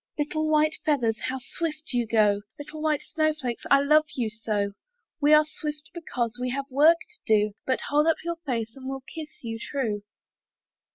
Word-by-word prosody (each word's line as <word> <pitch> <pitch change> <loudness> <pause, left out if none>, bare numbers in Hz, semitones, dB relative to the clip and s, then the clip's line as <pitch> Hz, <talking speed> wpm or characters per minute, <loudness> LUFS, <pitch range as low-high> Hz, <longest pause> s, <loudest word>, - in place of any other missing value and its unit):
Little 310 +1 -1
white 310 0 +3
feathers, 240 -7 +1
How 260 +1 -2
swift 305 +3 -5
you 240 -2 +1
go! 210 -2 +3 0.2
Little 300 +1 -8
white 305 -2 +1
snowflakes, 305 -6 -1
I 275 - +6
love 305 +2 +5
you 230 -4 -1
so! 210 -3 -1 0.5
"We 295 +1 +4
are 305 0 +7
swift 300 0 -6
because 245 -9 -3
We 250 - 0
have 275 +2 -2
work 305 +5 +6
to - - -16
do; 210 -1 +3
But 260 - +1
hold 295 +2 +3
up 325 - +4
your 340 0 -2
face, 235 -8 -3
And 265 -1 -7
we'll 270 0 -4
kiss 305 +2 -10
you 225 -1 -4
true." 230 -5 -2
275 Hz, 180 wpm, -26 LUFS, 230-305 Hz, 0.5 s, are